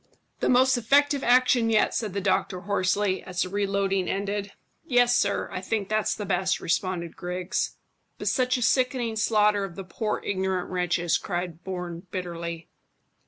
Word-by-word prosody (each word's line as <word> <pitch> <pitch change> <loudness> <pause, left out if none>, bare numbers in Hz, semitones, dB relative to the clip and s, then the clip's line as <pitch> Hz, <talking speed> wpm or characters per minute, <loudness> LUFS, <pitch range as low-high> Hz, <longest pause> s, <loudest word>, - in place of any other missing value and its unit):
"The - - +1
most 260 +1 +5
effective 285 +4 +3
action 245 -1 +4
yet," 220 -1 +3
said 215 -5 -2
the 200 - -2
doctor 185 -1 0
hoarsely, 195 0 0
as 180 -1 -2
the 185 - -5
reloading 195 -1 0
ended. 200 0 -2 0.3
"Yes, 245 -5 +3
sir, 200 -3 +1
I 185 - -4
think 200 0 -2
that's 215 0 +1
best," 190 -2 0
responded 175 -1 -2
Griggs. 180 +1 -3 0.4
"But - - -5
such 255 0 +2
a 245 - -1
sickening 250 -1 +1
slaughter 210 -2 +3
of 185 -3 -6
the 195 - -6
poor 210 +4 -3
ignorant 190 -2 -1
wretches," 175 -2 +1
cried 175 -3 -4
Bourne 180 -1 -6
bitterly. 170 -3 -5
195 Hz, 155 wpm, -26 LUFS, 180-225 Hz, 0.4 s, most